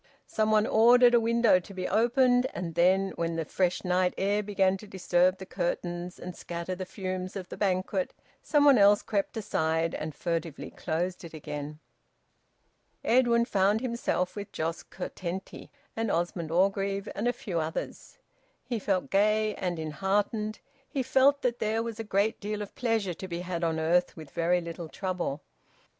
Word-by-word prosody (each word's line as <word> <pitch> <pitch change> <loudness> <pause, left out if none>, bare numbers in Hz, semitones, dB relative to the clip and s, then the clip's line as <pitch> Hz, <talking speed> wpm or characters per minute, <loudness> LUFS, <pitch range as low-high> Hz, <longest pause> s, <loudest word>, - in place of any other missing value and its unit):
Some 215 0 0
one 215 0 +4
ordered 240 +2 +6
a 240 - +7
window 230 -4 +4
to 190 +2 -12
be 185 -1 -2
opened, 245 +2 +3
and 170 -2 -4
then, 185 +3 +3
when 165 0 -1
the 165 -1 -2
fresh 180 +2 0
night 180 0 +1
air 205 +2 +1
began 195 -2 +1
to 210 - -12
disturb 185 -1 +2
the 190 - -8
curtains 175 -1 -3
and 180 0 -8
scatter 170 +1 -5
the 185 0 -5
fumes 185 -1 -4
of 185 -2 -6
the - - -6
banquet, 185 -1 0 0.3
some 295 -1 +3
one 275 -5 +7
else 205 +1 +6
crept 200 +1 -2
aside 160 -5 0
and 155 -1 -5
furtively 165 -3 -3
closed 175 +3 -3
it 165 -1 -9
again. 150 -1 -6 1.3
Edwin 235 -1 +4
found 205 +1 +2
himself 235 -7 -1
with 205 -1 -6
Jos 165 +1 -3
Curtenty 185 0 -6 0.3
and 225 -1 -1
Osmond 170 -2 -1
Orgreave 195 +3 +1
and 215 +4 -2
a - - +4
few 180 -8 -4
others. 160 0 -5 0.5
He 240 -1 -3
felt 190 -2 -1
gay 215 +2 +3
and 180 -3 -3
enheartened; 200 +7 -1 0.3
he 270 - -1
felt 270 +2 +3
that 245 -1 0
there 220 +1 0
was 230 -1 -6
a - - -2
great 210 +1 0
deal 210 0 -3
of 200 - -11
pleasure 225 -6 0
to 190 +3 -8
be 170 -1 -4
had 175 -1 -4
on 160 -1 0
earth 175 +3 +1
with 155 -3 -10
very 175 +1 +1
little 170 -1 -7
trouble. 180 -7 -3
190 Hz, 170 wpm, -28 LUFS, 175-215 Hz, 1.3 s, a